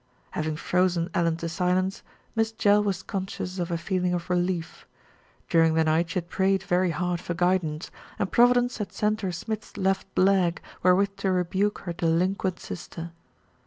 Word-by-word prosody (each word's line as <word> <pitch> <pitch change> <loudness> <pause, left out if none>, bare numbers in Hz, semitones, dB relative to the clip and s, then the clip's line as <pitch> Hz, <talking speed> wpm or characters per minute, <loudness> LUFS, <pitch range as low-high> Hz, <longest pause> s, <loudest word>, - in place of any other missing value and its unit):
Having 155 0 -2
frozen 180 +1 +1
Ellen 170 -3 +1
to 170 - -4
silence, 180 +3 0 0.3
Miss 225 0 +1
Jell 205 -1 +4
was 195 -3 -1
con 190 -2 -3
scious 185 0 -5
of 175 0 -2
a 170 - 0
feeling 180 0 0
of 175 +1 -4
relief. 175 -2 -1 0.6
During 165 -1 +4
the 160 - +4
night 160 +2 +2
she - - -6
had 175 -2 -1
prayed 190 +1 +1
very 180 0 +2
hard 175 +1 -1
for 170 - -4
guidance, 175 -3 0 0.3
and 195 - -1
Providence 245 0 +4
had 210 - -3
sent 215 +1 0
her 190 -3 -1
Smith's 210 +4 -5
left 195 -1 -1
leg 185 -3 +3 0.2
wherewith 195 +2 +3
to 190 - 0
rebuke 185 +3 0
her 175 - -4
delinquent 180 +3 0
sister. 170 -1 -7
180 Hz, 170 wpm, -26 LUFS, 170-195 Hz, 0.6 s, Jell